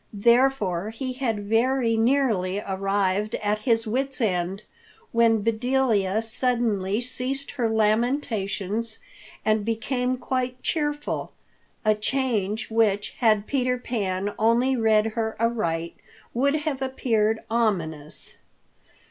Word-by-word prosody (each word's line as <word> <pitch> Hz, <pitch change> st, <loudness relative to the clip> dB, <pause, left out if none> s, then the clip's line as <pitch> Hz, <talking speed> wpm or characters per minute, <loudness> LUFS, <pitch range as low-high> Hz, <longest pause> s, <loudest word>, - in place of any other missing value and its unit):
Therefore 215 Hz, -4 st, +2 dB
he 255 Hz, +3 st, -4 dB
had 230 Hz, -6 st, -2 dB
very 230 Hz, +1 st, +2 dB
nearly 225 Hz, -6 st, +2 dB
arrived 195 Hz, +1 st, 0 dB
at 210 Hz, 0 st, -1 dB
his 225 Hz, 0 st, +1 dB
wits' 265 Hz, +5 st, -2 dB
end 190 Hz, -2 st, -1 dB, 0.5 s
when 230 Hz, -2 st, +3 dB
Bedelia 225 Hz, -3 st, +1 dB
suddenly 225 Hz, -4 st, 0 dB
ceased 255 Hz, +3 st, -3 dB
her 235 Hz, -4 st, -1 dB
lamentations 220 Hz, -2 st, 0 dB, 0.5 s
and 215 Hz, -1 st, +2 dB
became 250 Hz, +3 st, -1 dB
quite 255 Hz, 0 st, -2 dB
cheerful—a 295 Hz, -7 st, -2 dB
change 220 Hz, -2 st, -1 dB
which, 210 Hz, -3 st, +2 dB
had 215 Hz, -4 st, +3 dB
Peter 255 Hz, -1 st, 0 dB
Pan 205 Hz, -5 st, -2 dB
only 235 Hz, +4 st, +3 dB
read 220 Hz, -2 st, +3 dB
her 220 Hz, -2 st, -2 dB
aright, 170 Hz, -8 st, -1 dB, 0.4 s
would 280 Hz, +4 st, +2 dB
have 300 Hz, -3 st, -2 dB
appeared 225 Hz, -5 st, +1 dB
ominous. 170 Hz, -10 st, -1 dB
225 Hz, 105 wpm, -25 LUFS, 205-250 Hz, 0.5 s, when